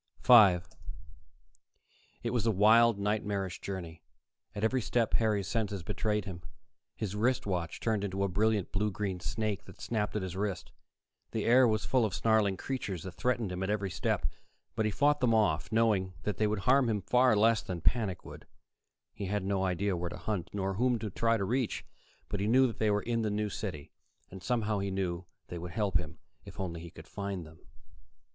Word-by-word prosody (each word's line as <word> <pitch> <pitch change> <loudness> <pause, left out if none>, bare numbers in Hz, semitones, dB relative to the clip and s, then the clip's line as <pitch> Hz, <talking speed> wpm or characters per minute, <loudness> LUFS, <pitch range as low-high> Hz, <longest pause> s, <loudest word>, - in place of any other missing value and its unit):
5 95 -8 +7 1.6
It - - -1
was 120 -2 0
a - - +5
wild, 110 +2 +5
nightmarish 100 -2 -2
journey. 85 -4 -6 0.5
At 105 - -4
every 125 +3 +2
step, 115 0 0
Harry's 105 -4 +1
senses 105 -5 -2
betrayed 105 +3 -1
him: 90 -3 -7 0.5
his 105 -2 -4
wrist 120 +4 +1
watch 90 -5 -2
turned 110 -3 0
into 100 -1 -2
a - - +2
brilliant 105 +1 +1
blue 105 +1 0
green 95 -2 -3
snake 105 +2 -3
that - - -14
snapped 105 -3 -2
at 105 - -1
his 90 -1 -5
wrist; 95 -3 -3 0.6
the - - -2
air 125 +2 +6
was 110 -2 0
full 130 -2 +2
of 105 -4 -1
snarling 110 -4 +2
creatures 100 -10 -4
that 95 - -6
threatened 120 +1 -1
him 90 +1 -4
at 95 - -1
every 100 -2 -1
step. 90 -1 -1 0.5
But 110 - 0
he - - -1
fought 145 +8 +3
them 120 -3 +3
off, 90 -7 +1
knowing 105 -5 +2
that 105 - -2
they 110 - +2
would 105 -2 -1
harm 130 +2 +4
him 105 -2 0
far 125 +1 +4
less 110 +1 +4
than 90 -2 -5
panic 100 -4 0
would. - - -11 0.7
He 100 - -5
had 105 0 -1
no 95 0 0
idea 95 +1 0
where 85 0 -3
to 85 - -7
hunt, 90 0 -3
nor 95 -1 -2
whom 120 +4 +2
to 110 -2 -5
try 115 +4 +2
to 100 - -1
reach, 125 +3 -1 0.4
but 105 - -3
he 100 - 0
knew 130 +4 +5
they 110 0 0
were 105 0 +1
there 120 - -2
in 115 - +1
the 110 - 0
New 105 0 -1
City, 90 -8 -6 0.4
and 95 - -9
somehow 110 0 0
he 100 0 -2
knew 90 -2 -2 0.2
they 85 - -5
would 85 +1 -7
help 100 -4 +1
him, 85 -1 -8 0.3
if - - -12
only 85 -3 -4
he 85 - -9
could - - -13
find 100 -4 -5
them. 80 +1 -15
105 Hz, 200 wpm, -31 LUFS, 95-110 Hz, 1.6 s, 5